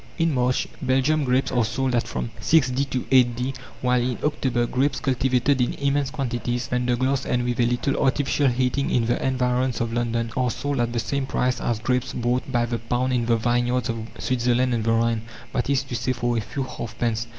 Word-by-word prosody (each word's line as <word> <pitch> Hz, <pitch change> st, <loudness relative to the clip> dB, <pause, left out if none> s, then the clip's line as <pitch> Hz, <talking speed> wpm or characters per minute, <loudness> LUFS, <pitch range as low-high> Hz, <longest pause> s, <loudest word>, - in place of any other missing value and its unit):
In 165 Hz, -2 st, +2 dB
March, 125 Hz, -1 st, +1 dB
Belgium 135 Hz, +3 st, +2 dB
grapes 130 Hz, +1 st, +1 dB
are 120 Hz, -2 st, +2 dB
sold 130 Hz, +3 st, -1 dB
at 120 Hz, -1 st, +1 dB
from -, -, -4 dB
6d. 135 Hz, -3 st, +2 dB
to 130 Hz, -, -1 dB
8d., 125 Hz, 0 st, +2 dB, 0.3 s
while 125 Hz, -1 st, +3 dB
in 125 Hz, 0 st, -1 dB
October, 130 Hz, -5 st, 0 dB
grapes 130 Hz, +2 st, 0 dB
cultivated 130 Hz, +1 st, +1 dB
in 120 Hz, -, +1 dB
immense 140 Hz, -1 st, 0 dB
quantities 120 Hz, -4 st, -2 dB
under 125 Hz, 0 st, +1 dB
glass, 130 Hz, +2 st, 0 dB
and 120 Hz, 0 st, 0 dB
with 120 Hz, 0 st, -2 dB
a 120 Hz, -, +4 dB
little 125 Hz, +3 st, 0 dB
artificial 140 Hz, +1 st, +2 dB
heating 130 Hz, +2 st, +1 dB
in 120 Hz, -2 st, +2 dB
the 120 Hz, -, 0 dB
environs 125 Hz, -1 st, 0 dB
of 115 Hz, 0 st, -2 dB
London 115 Hz, -1 st, -1 dB
are 125 Hz, -1 st, +1 dB
sold 140 Hz, +4 st, -2 dB
at 120 Hz, 0 st, +1 dB
the 120 Hz, -, -3 dB
same 135 Hz, +4 st, -2 dB
price 125 Hz, -1 st, 0 dB
as 120 Hz, -, 0 dB
grapes 125 Hz, +3 st, -1 dB
bought 125 Hz, +2 st, -1 dB
by 120 Hz, -2 st, +2 dB
the 120 Hz, 0 st, -3 dB
pound 125 Hz, +2 st, -1 dB
in 120 Hz, -2 st, 0 dB
the 115 Hz, -1 st, +3 dB
vineyards 120 Hz, +1 st, 0 dB
of 115 Hz, -1 st, -3 dB
Switzerland 125 Hz, 0 st, +1 dB
and 115 Hz, -2 st, -1 dB
the 115 Hz, -, +2 dB
Rhine, 115 Hz, 0 st, +2 dB, 0.3 s
that 125 Hz, -, -1 dB
is 140 Hz, -1 st, +2 dB
to 130 Hz, -3 st, -6 dB
say, 130 Hz, +2 st, 0 dB
for 120 Hz, -1 st, -1 dB
a 115 Hz, -, +1 dB
few 135 Hz, +6 st, -4 dB
halfpence. 115 Hz, -2 st, -3 dB
125 Hz, 205 wpm, -24 LUFS, 120-130 Hz, 0.3 s, a